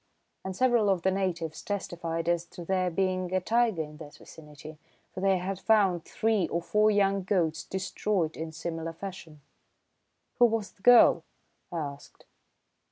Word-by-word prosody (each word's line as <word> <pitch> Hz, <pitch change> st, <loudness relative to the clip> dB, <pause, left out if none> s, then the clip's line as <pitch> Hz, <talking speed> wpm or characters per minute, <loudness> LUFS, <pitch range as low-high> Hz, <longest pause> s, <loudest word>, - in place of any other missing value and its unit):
And 190 Hz, -1 st, -5 dB
several 240 Hz, -3 st, +3 dB
of 185 Hz, -3 st, +1 dB
the 190 Hz, -, +3 dB
natives 170 Hz, -5 st, -2 dB
testified 170 Hz, -4 st, -4 dB
as 170 Hz, -1 st, +1 dB
to 175 Hz, 0 st, -10 dB
there 185 Hz, 0 st, 0 dB
being 185 Hz, 0 st, -1 dB
a -, -, +3 dB
tiger 220 Hz, -3 st, +1 dB
in 150 Hz, 0 st, -11 dB
that 150 Hz, -2 st, -11 dB
vicinity, 150 Hz, 0 st, -13 dB, 0.3 s
for -, -, -6 dB
they 195 Hz, -1 st, +3 dB
had 185 Hz, +1 st, -4 dB
found 195 Hz, -7 st, +2 dB
three 220 Hz, -5 st, 0 dB
or 170 Hz, -, -1 dB
four 210 Hz, +5 st, +2 dB
young 200 Hz, -1 st, +2 dB
goats 175 Hz, -4 st, 0 dB
destroyed 190 Hz, -2 st, -2 dB
in 160 Hz, 0 st, -5 dB
similar 165 Hz, 0 st, -5 dB
fashion." 170 Hz, -4 st, -9 dB, 1.0 s
"Who 245 Hz, -, +8 dB
was 225 Hz, -3 st, -2 dB
the -, -, -30 dB
girl?" 245 Hz, +2 st, +6 dB, 0.5 s
I 175 Hz, -, -4 dB
asked. 145 Hz, -2 st, -7 dB
185 Hz, 160 wpm, -28 LUFS, 165-200 Hz, 1.0 s, Who